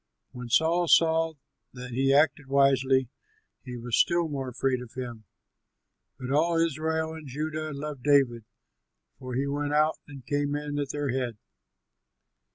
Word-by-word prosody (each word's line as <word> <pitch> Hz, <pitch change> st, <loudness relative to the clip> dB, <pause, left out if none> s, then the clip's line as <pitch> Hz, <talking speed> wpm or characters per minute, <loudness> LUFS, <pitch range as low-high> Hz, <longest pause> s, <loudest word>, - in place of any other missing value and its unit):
When 125 Hz, -1 st, -8 dB
Saul 170 Hz, +6 st, +3 dB
saw 165 Hz, 0 st, +4 dB, 0.4 s
that 125 Hz, 0 st, -8 dB
he 135 Hz, +3 st, +1 dB
acted 145 Hz, 0 st, +3 dB
wisely, 135 Hz, -1 st, +3 dB, 0.6 s
he 125 Hz, -2 st, -7 dB
was 120 Hz, 0 st, -2 dB
still 170 Hz, -1 st, +3 dB
more 135 Hz, -4 st, -4 dB
afraid 130 Hz, 0 st, -1 dB
of 125 Hz, -2 st, -11 dB
him. 120 Hz, -4 st, -7 dB, 0.9 s
But 130 Hz, 0 st, -6 dB
all 165 Hz, +4 st, +2 dB
Israel 160 Hz, 0 st, 0 dB
and 160 Hz, -2 st, -9 dB
Judah 155 Hz, +3 st, -4 dB
loved 140 Hz, -1 st, -6 dB
David, 130 Hz, -4 st, +3 dB, 0.8 s
for 130 Hz, -1 st, -6 dB
he 135 Hz, +2 st, 0 dB
went 145 Hz, +1 st, -2 dB
out 155 Hz, +1 st, +2 dB
and 140 Hz, -4 st, -11 dB
came 145 Hz, -1 st, -1 dB
in 145 Hz, 0 st, -3 dB
at 140 Hz, -1 st, -2 dB
their 145 Hz, 0 st, -2 dB
head. 125 Hz, -3 st, -2 dB
140 Hz, 150 wpm, -27 LUFS, 130-155 Hz, 0.9 s, saw